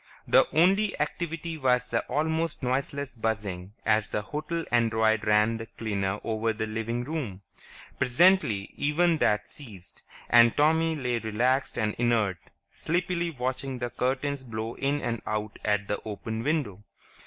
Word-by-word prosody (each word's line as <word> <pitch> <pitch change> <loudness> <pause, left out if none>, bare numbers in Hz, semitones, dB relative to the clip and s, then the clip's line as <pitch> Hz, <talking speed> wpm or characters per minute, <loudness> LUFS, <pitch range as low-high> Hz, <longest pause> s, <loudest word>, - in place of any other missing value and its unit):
The - - +5
only 195 +6 +3
activity 165 +1 -3
was 125 -2 +1
the 115 - +2
almost 160 +3 -1
noiseless 135 +2 -2
buzzing 105 -5 -3
as 110 -1 +2
the 105 - -2
hotel 165 +7 -4
android 110 -2 +2
ran 105 +2 +3
the 115 0 -7
cleaner 100 -3 -2
over 110 0 0
the 110 0 -3
living 115 +2 -3
room. 125 - -5 0.6
Presently 130 - +3
even 160 +3 +2
that 105 -5 +2
ceased, 105 -11 -12 0.3
and 120 -1 +6
Tommy 160 +2 +3
lay 125 -5 -1
relaxed 125 +6 0
and 110 -2 0
inert, 110 -7 +1 0.3
sleepily 170 +1 -1
watching 130 -2 -3
the 120 -1 -4
curtains 135 +2 -1
blow 115 -2 -5
in 140 +2 -1
and 115 -2 -2
out 105 0 -3
at 105 -1 0
the 105 - -2
open 110 +1 -5
window. 125 - -1
120 Hz, 145 wpm, -27 LUFS, 110-150 Hz, 0.6 s, and